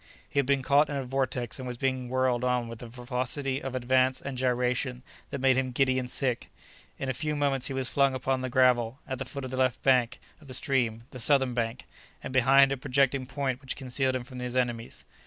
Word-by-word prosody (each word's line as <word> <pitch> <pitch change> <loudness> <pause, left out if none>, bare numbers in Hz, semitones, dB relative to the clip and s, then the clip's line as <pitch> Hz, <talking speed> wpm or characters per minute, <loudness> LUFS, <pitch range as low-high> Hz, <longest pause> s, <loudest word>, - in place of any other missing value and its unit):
He 140 - -1
had 140 - +1
been 140 -1 +2
caught 140 +2 +4
in 145 - -3
a 135 - -2
vortex 125 -2 -2
and 130 - -5
was 125 -1 -5
being 130 -1 -1
whirled 130 -1 +1
on 125 -1 +1
with 115 -1 -9
a 120 - -7
velocity 125 +3 -2
of 130 -1 -5
advance 130 +1 +2
and 140 -1 -6
gyration 125 0 -1 0.3
that 140 - -4
made 130 0 +4
him 130 -1 -1
giddy 130 +1 +2
and 125 -1 -5
sick. 125 -2 -1 0.5
In 135 -1 -2
few 150 +4 -2
moments 140 -3 0
he 135 - -4
was 130 -1 -1
flung 140 -1 +3
upon 130 0 -1
the 130 - -3
gravel 125 -1 +3
at 130 -2 -4
the 135 - -3
foot 140 +1 -6
of 130 - -6
the 130 - -4
left 130 -2 +1
bank 125 -2 +3 0.2
of 150 - -16
the 130 - -4
stream—the 120 -2 -1
southern 130 0 +4
bank—and 120 +2 -6
behind 135 +2 +5
a 135 - -1
projecting 135 0 +1
point 135 -2 -2
which 130 - -3
concealed 130 0 -1
him 130 - -2
from 125 +1 -10
his 125 0 -4
enemies. 120 -2 -2
130 Hz, 220 wpm, -28 LUFS, 125-135 Hz, 0.5 s, behind